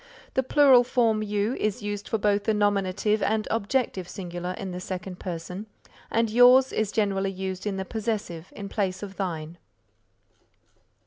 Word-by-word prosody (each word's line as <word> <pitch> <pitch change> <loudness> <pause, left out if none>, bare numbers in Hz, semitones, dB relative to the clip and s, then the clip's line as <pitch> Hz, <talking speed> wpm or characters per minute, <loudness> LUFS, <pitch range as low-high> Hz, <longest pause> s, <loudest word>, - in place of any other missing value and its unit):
The 265 - +2
Plural 265 -1 +6
form 230 -3 +2
You 210 +2 0
is 215 +2 -1
used 205 0 -4
for 225 - +1
both 205 -1 +1
the 220 - +2
nominative 205 +1 +1
and 215 +1 0
objective 220 -4 -1
singular 180 -1 -5
in 190 0 -6
the 180 - -5
second 185 0 -6
person 180 +4 -6 0.4
and 230 0 +2
Yours 250 +3 +6
is 215 -1 0
generally 195 -3 0
used 190 +1 -4
in 195 -2 -2
the 190 - -3
possessive 205 -5 -4
in 200 - -6
place 195 -2 -2
of 195 -1 -8
Thine. 170 -3 -4
205 Hz, 155 wpm, -26 LUFS, 185-220 Hz, 0.4 s, Plural